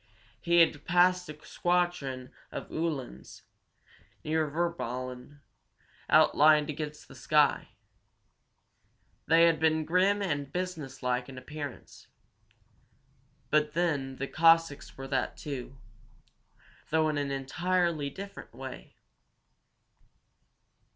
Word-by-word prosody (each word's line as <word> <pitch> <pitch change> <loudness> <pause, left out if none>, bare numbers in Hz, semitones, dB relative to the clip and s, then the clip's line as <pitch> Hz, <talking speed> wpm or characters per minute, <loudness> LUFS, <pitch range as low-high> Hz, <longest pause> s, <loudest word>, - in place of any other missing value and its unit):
He 170 -1 +4
had 160 -3 +2
passed 180 0 +3
a 150 0 -10
squadron 175 -8 -1 0.2
of - - -7
Uhlans, 135 - -4 0.8
near 155 0 0
Virballen, 140 -4 -4 0.7
outlined 150 0 +5
against 150 0 -7
the - - -13
sky. 145 +2 +2 1.6
They 165 +1 +6
had 165 -2 +4
been 160 0 +2
grim 195 +5 +2
and 145 -6 -2
business 165 -8 -5
like 125 +1 -1
in 130 - -10
appearance. 145 +1 -8 1.4
But 150 0 +2
then 150 -6 -1
the 135 - -3
Cossacks 165 -2 +3
were 135 0 -7
that, 135 - -1
too, 135 -2 -6 1.1
though 160 0 +2
in 150 -1 0
an 140 -1 -2
entirely 160 +3 -1
different 195 +7 -10
way. - - -9
150 Hz, 100 wpm, -29 LUFS, 135-170 Hz, 1.6 s, They